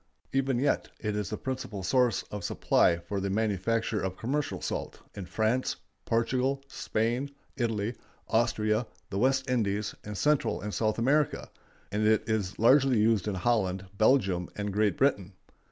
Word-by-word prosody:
Even 135 Hz, -1 st, +1 dB
yet 140 Hz, +3 st, +1 dB
it 105 Hz, -1 st, -2 dB
is 105 Hz, -3 st, -2 dB
the 105 Hz, -, -3 dB
principal 130 Hz, -7 st, -5 dB
source 125 Hz, +3 st, +2 dB
of 105 Hz, -, -5 dB
supply 85 Hz, -, +3 dB
for 95 Hz, +4 st, -4 dB
the 100 Hz, 0 st, -2 dB
manufacture 110 Hz, +1 st, 0 dB
of 95 Hz, -1 st, -3 dB
commercial 145 Hz, +5 st, -2 dB
salt -, -, -4 dB
in 95 Hz, -3 st, -7 dB
France, 110 Hz, +6 st, 0 dB, 0.3 s
Portugal, 130 Hz, +4 st, 0 dB
Spain, 120 Hz, +2 st, -1 dB, 0.3 s
Italy, 115 Hz, -3 st, -1 dB, 0.3 s
Austria, 110 Hz, 0 st, +1 dB, 0.2 s
the 95 Hz, -, -1 dB
West 130 Hz, +2 st, +2 dB
Indies, 105 Hz, -4 st, 0 dB
and 105 Hz, -1 st, -6 dB
Central 150 Hz, +4 st, +2 dB
and 105 Hz, 0 st, -5 dB
South 110 Hz, -1 st, 0 dB
America; 140 Hz, +5 st, +1 dB, 0.4 s
and 105 Hz, +1 st, +1 dB
it 110 Hz, -1 st, +3 dB
is 105 Hz, -4 st, -1 dB
largely 130 Hz, +2 st, +5 dB
used 110 Hz, -2 st, +2 dB
in 105 Hz, -, -1 dB
Holland, 95 Hz, -2 st, 0 dB
Belgium, 100 Hz, -6 st, +2 dB
and 100 Hz, -1 st, -3 dB
Great 105 Hz, -3 st, +2 dB
Britain. 100 Hz, -9 st, +1 dB
110 Hz, 155 wpm, -29 LUFS, 100-125 Hz, 0.4 s, largely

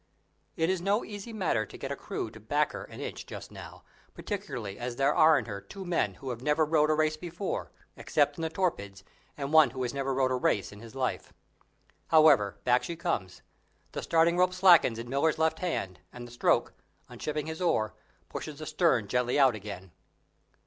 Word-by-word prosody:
It 165 Hz, +2 st, +1 dB
is 190 Hz, -2 st, -1 dB
no 200 Hz, +4 st, +1 dB
easy 205 Hz, +2 st, -8 dB
matter 185 Hz, -, 0 dB
to 100 Hz, -, -11 dB
get -, -, -5 dB
a -, -, -1 dB
crew -, -, -5 dB
to -, -, -12 dB
back -, -, 0 dB
her -, -, -7 dB
an -, -, -12 dB
inch -, -, -5 dB
just -, -, -9 dB
now, -, -, -11 dB, 0.3 s
particularly 105 Hz, -5 st, -5 dB
as 120 Hz, 0 st, -4 dB
there 140 Hz, +3 st, +2 dB
are 155 Hz, -1 st, +6 dB
in 135 Hz, -, -2 dB
her 100 Hz, -3 st, -6 dB
two 195 Hz, -2 st, -9 dB
men 175 Hz, -1 st, 0 dB
who 135 Hz, -3 st, -6 dB
have 120 Hz, -1 st, -6 dB
never 150 Hz, +3 st, +2 dB
rowed 150 Hz, 0 st, +3 dB
a 155 Hz, -, +3 dB
race 155 Hz, 0 st, +1 dB
before, 175 Hz, +4 st, -4 dB, 0.2 s
except -, -, +1 dB
in 165 Hz, -, -7 dB
the 160 Hz, -, -1 dB
torpids, 160 Hz, -, -2 dB, 0.3 s
and 140 Hz, +1 st, -4 dB
one 155 Hz, -4 st, +7 dB
who 130 Hz, +1 st, -4 dB
has 125 Hz, -, -2 dB
never 135 Hz, -1 st, -2 dB
rowed 130 Hz, -1 st, +1 dB
a -, -, +2 dB
race 115 Hz, -5 st, 0 dB
in 100 Hz, -, -12 dB
his 115 Hz, +2 st, -12 dB
life. 130 Hz, -1 st, -3 dB, 0.7 s
However, 150 Hz, -11 st, +5 dB
back 125 Hz, 0 st, +3 dB
she 170 Hz, -, -5 dB
comes; 160 Hz, -, -3 dB, 0.5 s
the -, -, -4 dB
starting 165 Hz, +1 st, +3 dB
rope 180 Hz, 0 st, +3 dB
slackens 175 Hz, -10 st, +6 dB
in 115 Hz, +1 st, -6 dB
Miller's 140 Hz, +5 st, +1 dB
left 160 Hz, +3 st, +1 dB
hand, 100 Hz, -, -3 dB
and 120 Hz, -1 st, -9 dB
the -, -, -14 dB
stroke, 120 Hz, -, +1 dB, 0.3 s
unshipping 150 Hz, -1 st, -4 dB
his 160 Hz, +2 st, -6 dB
oar, 135 Hz, -12 st, +1 dB, 0.3 s
pushes 155 Hz, -2 st, -7 dB
the 155 Hz, -, -7 dB
stern 150 Hz, -, +2 dB
gently 125 Hz, +4 st, 0 dB
out 135 Hz, -3 st, +5 dB
again. 100 Hz, -3 st, -8 dB
150 Hz, 205 wpm, -29 LUFS, 120-165 Hz, 0.7 s, one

